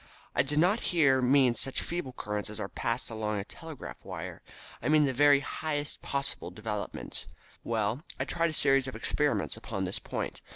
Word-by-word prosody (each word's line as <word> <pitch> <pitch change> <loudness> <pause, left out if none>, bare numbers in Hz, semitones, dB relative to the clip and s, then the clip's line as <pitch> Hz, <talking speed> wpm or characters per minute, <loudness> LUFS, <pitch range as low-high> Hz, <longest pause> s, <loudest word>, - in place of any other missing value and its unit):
I - - +4
did 145 +3 -2
not 180 +8 +4
here 140 - +4
mean 130 -1 +5
such 135 +2 -2
feeble 170 -6 -3
currents 105 -2 -3
as 105 0 -6
are 100 - -2
passed 115 +3 -2
along 110 -1 -1
a 100 - -2
telegraph 160 +6 -9
wire, - - -6 0.4
but - - -3
I - - +2
mean 155 -1 +6
the 135 - +1
very 145 +1 +6
highest 145 0 -2
possible 140 -9 -2
developments. 105 +2 -5 0.4
Well, 115 +3 0 0.2
I - - 0
tried 170 0 +1
a - - -4
series 135 -2 +4
of 130 - -5
experiments 150 -1 +1
upon 105 -6 -3
this 95 0 -2
point. - - -4
135 Hz, 190 wpm, -30 LUFS, 110-150 Hz, 0.4 s, mean